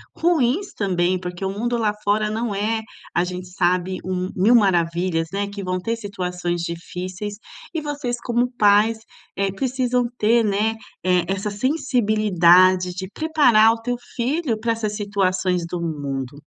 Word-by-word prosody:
ruins 335 +2 +1
também, 185 -2 0
porque 180 +1 -6
o - - 0
mundo 235 +4 -1
lá 215 -2 +1
fora 210 +1 +1
não 220 -1 -2
é, 220 +2 0 0.3
a 175 - +2
gente 180 0 -6
sabe, 180 0 0
um 185 0 -2
1.000 205 +6 +4
maravilhas, 175 -4 +2
né. 200 +1 0
Que 200 0 -7
vão 185 0 -1
ter 230 +5 -2
situações 180 -4 -3
difíceis 180 +4 -5 0.4
e 325 - -2
vocês 290 -5 -3
como 240 +1 0
pais, 210 +1 +4 0.4
eh, 195 0 0
precisam 250 +2 0
ter, 230 +2 +3
né, 210 +2 +1 0.3
eh, 180 -2 +3
essa 195 +2 -2
sensibilidade 200 - +3
de 190 0 -5
preparar 250 -9 +4
o 225 - -7
teu 245 +1 -2 0.2
filho 260 0 0
para 230 +1 0
essas 220 -2 -2
situações 185 -4 0
do 170 0 -4
mundo. 145 -3 -4
200 Hz, 150 wpm, -22 LUFS, 180-230 Hz, 0.4 s, 1.000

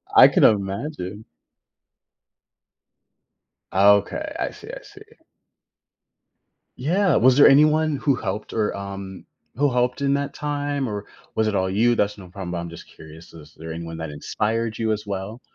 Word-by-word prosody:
I - - +10
can - - +2
imagine. 105 0 0 2.5
Okay. 100 +1 +3
I - - -2
see, - - -14
I - - -9
see. - - -15 1.8
Yeah. 175 +4 +1
Was 130 +2 +4
there 145 - +8
anyone 150 +1 +4
who 135 -1 +1
helped 105 0 -5
or, 110 -2 -1
um 100 -1 -7 0.3
who 140 0 +1
helped 125 +2 0
in 140 0 +2
that 140 0 -3
time, 145 -3 -3
or 105 -1 -5 0.3
was 110 0 +1
it 110 - -1
all 95 0 0
you? 115 +5 +2
That's 105 0 0
no 95 -2 -11
problem, 90 -1 -7
but 90 - -3
I'm 85 0 -5
just 85 - -11
curious, 80 +2 -14
is 75 -1 -14
there 80 0 -8
anyone 80 0 -6
that 80 -1 -5
inspired 110 +9 -2
you 110 -1 0
as 105 0 -3
well? 100 +4 -5
105 Hz, 160 wpm, -23 LUFS, 95-135 Hz, 2.5 s, I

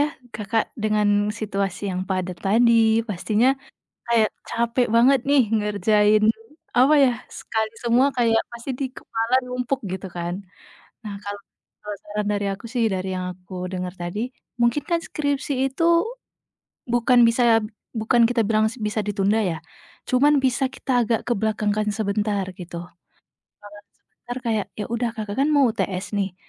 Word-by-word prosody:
ya, 295 +1 +1 0.2
Kakak 220 +1 -1
dengan 210 -2 +2
situasi 200 -2 -3
yang 185 0 -2
padat 185 -2 -2
tadi, 225 +1 +4
pastinya 215 +5 +1 0.6
kayak 225 -2 +4 0.2
capek 235 +1 +1
banget 260 +4 +6
nih 280 -3 +5
ngerjain, 210 0 +3 0.5
apa 270 +5 +6
ya, 270 -3 +5 0.2
sekali 220 -1 -3
semua 240 +3 +3
kayak 225 -2 +3
pasti 235 +3 -9
di 270 - 0
kepala 230 -1 -2
numpuk, 250 +1 -2
gitu 190 0 -5
kan. 175 0 -4 0.7
Nah, 205 - -5
kalau 205 0 -5 0.4
kalau 210 -1 -6
saran 210 0 -3
dari 205 -1 0
aku 195 - -9
sih 235 -1 0
dari 185 0 -2
yang 180 0 -3
aku 180 0 -8
dengar 180 -1 -3
tadi, 185 +8 -3 0.3
mungkin 235 +5 +2
kan 340 -1 0
skripsi 285 -3 -2 0.2
itu 330 - -1 1.0
bukan 240 0 +4
bisa, 230 -1 +4 0.3
bukan 235 +1 +2
kita 230 -3 +1
bilang 215 0 +2
bisa 215 0 -1
ditunda 205 +1 +1
ya, 170 -5 -1 0.5
cuman 285 +3 +4
bisa 265 0 +1
kita 250 -2 0
agak 230 0 +1
kebelakangkan 215 -2 0
sebentar, 205 -1 -1
gitu. 175 -1 -8 0.8
Belakang 205 0 -13
sebentar 245 +1 -11
kayak, 220 -4 0
ya 210 - -4
udah 235 0 0
kakak 210 -2 -5
kan 280 +3 +3
mau 275 -4 +5
UTS 190 -3 -3
nih. 195 -2 -2
220 Hz, 145 wpm, -23 LUFS, 205-240 Hz, 1.0 s, banget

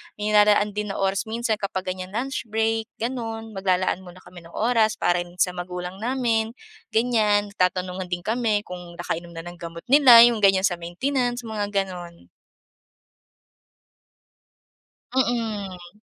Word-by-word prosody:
may 210 0 -3
nilalaan 210 0 +4
din 210 0 -1
na - - -8
oras 195 +3 0
minsan 225 0 -1
kapag 190 -2 -4
ganyan 185 +1 -6
lunch 265 +4 -3
break, 225 +1 0 0.2
ganun. 225 -2 -4
Maglalaan 185 -1 0
muna 180 +1 -13
kami 175 -2 -14
ng 170 - -15
oras 225 -1 +2
para 175 0 +1
rin 175 0 -7
sa 180 - +3
magulang 180 +1 -5
namin, 230 -2 0 0.4
ganyan. 215 -3 +2
Nagtatanungan 185 -1 -1
din 175 - -2
kami 220 -1 0
kung 180 -3 -9
nakainom 170 0 -5
na 165 - -6
ng 175 +1 -9
gamot 170 0 -8
nila 260 -4 +9
yung 240 -1 +4
ganyan 195 -2 +4
sa 180 -3 +2
maintenance, 245 +8 -1
mga 215 -2 -3
gano'n. 180 -3 -4 2.9
Mm. 210 -7 -2
205 Hz, 140 wpm, -24 LUFS, 180-225 Hz, 2.9 s, nila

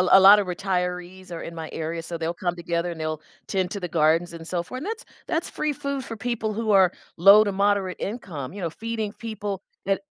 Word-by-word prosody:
l 180 - +1
a 195 - +10
lot 200 +2 +10
of 200 - 0
retirees 180 0 -3
are 170 - -5
in 165 - -7
my 160 -1 -5
area, 165 +1 -3
so 170 +1 -5
they'll 165 +1 -1
come 175 0 -2
together 170 0 -1
and 165 - -7
they'll 155 -1 -2 0.3
tend 190 -2 0
to 200 - -4
the 180 - -3
gardens 165 +2 +2
and 165 -1 -9
so 175 -2 -1
for 255 +9 -7
and 300 - -6
that's 445 +2 -4 0.2
that's 330 +1 -1
free 305 -1 -1
food 280 -2 -3
for 225 - -6
people 220 -1 -2
who 220 0 -1
are 190 -3 +6 0.3
low 200 +4 +9
to 200 - -1
moderate 200 -1 +1
income, 180 - -5
you 200 - -6
know, 165 - -1
feeding 220 +1 -3
people 210 -4 -5 0.2
that 195 0 +1
190 Hz, 235 wpm, -25 LUFS, 170-210 Hz, 0.3 s, a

